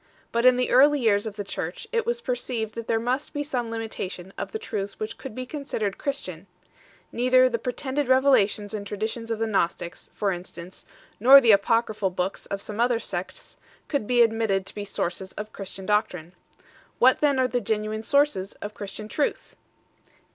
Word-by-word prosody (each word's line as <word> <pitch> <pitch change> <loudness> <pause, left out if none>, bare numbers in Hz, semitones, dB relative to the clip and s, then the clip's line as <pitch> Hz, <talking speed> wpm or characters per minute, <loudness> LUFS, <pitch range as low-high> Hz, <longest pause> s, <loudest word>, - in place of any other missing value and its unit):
But 235 +2 +3
in 255 -1 +6
the 250 - 0
early 285 +3 +6
years 220 -3 +2
of 210 - -6
the 205 - -4
Church 175 -3 -5
it 465 -1 0
was 475 0 0
perceived 240 - -3
that 230 -1 -6
there 225 - +2
must 250 +6 -2
be 290 - -1
some 250 -5 -3
limitation 200 -5 -5
of - - -5
the 440 - -3
truths 200 - -5
which 215 +1 -4
could 265 -5 -9
be 255 - -4
considered 250 -8 -3
Christian; 195 - -4 0.6
neither 255 +1 +4
the 235 -2 -1
pretended 265 +4 -2
revelations 255 -6 +3
and 205 -1 -4
traditions 220 +3 -4
of 225 - -1
the 225 - 0
Gnostics, 175 -4 -2
for 200 -2 0
instance, 175 0 -9 0.3
nor 265 +6 +10
the 240 -4 +5
apocryphal 215 0 +2
books 180 +1 -3
of 200 0 -4
some 210 +1 -7
other 240 -1 +3
sects, 185 -3 -6 0.3
could 280 -8 -1
be 245 -1 +5
admit 225 0 +1
ted 195 -2 0
to - - -4
be 205 -1 -5
sources 190 -1 -3
of 210 +1 -7
Christian 195 -1 -7
doctrine. 185 -5 0 0.6
What 255 +1 +5
then 285 -2 +3
are 260 -1 +3
the 245 -1 -1
.genuine 215 0 -2
sources 235 -6 +1
of 205 +1 -8
Christian 205 +1 -7
truth 285 +6 -2
225 Hz, 185 wpm, -25 LUFS, 200-255 Hz, 0.6 s, nor